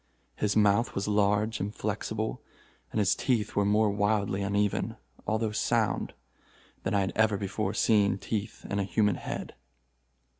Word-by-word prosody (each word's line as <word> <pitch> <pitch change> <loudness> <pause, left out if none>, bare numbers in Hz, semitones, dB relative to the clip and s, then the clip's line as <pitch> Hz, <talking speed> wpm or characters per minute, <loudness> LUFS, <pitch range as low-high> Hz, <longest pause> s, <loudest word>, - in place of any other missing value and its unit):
His 105 - 0
mouth 105 +2 +3
was 100 - -1
large 105 +1 +2
and 100 +2 -2
flexible, 110 +1 -3 0.5
and - - -3
his 100 -2 +3
teeth 120 -5 0
were 100 - +3
more 105 +1 +3
wildly 100 -1 +1
uneven, 100 0 0 0.3
although 110 0 0
sound, 105 - 0 0.7
than - - -1
I 100 - +3
had 95 - -1
ever 110 -2 +3
before 100 +1 -2
seen 105 -4 +3
teeth 105 +1 -4
in 100 - -1
a - - +1
human 105 0 +1
head. - - -5
105 Hz, 150 wpm, -29 LUFS, 100-110 Hz, 0.7 s, mouth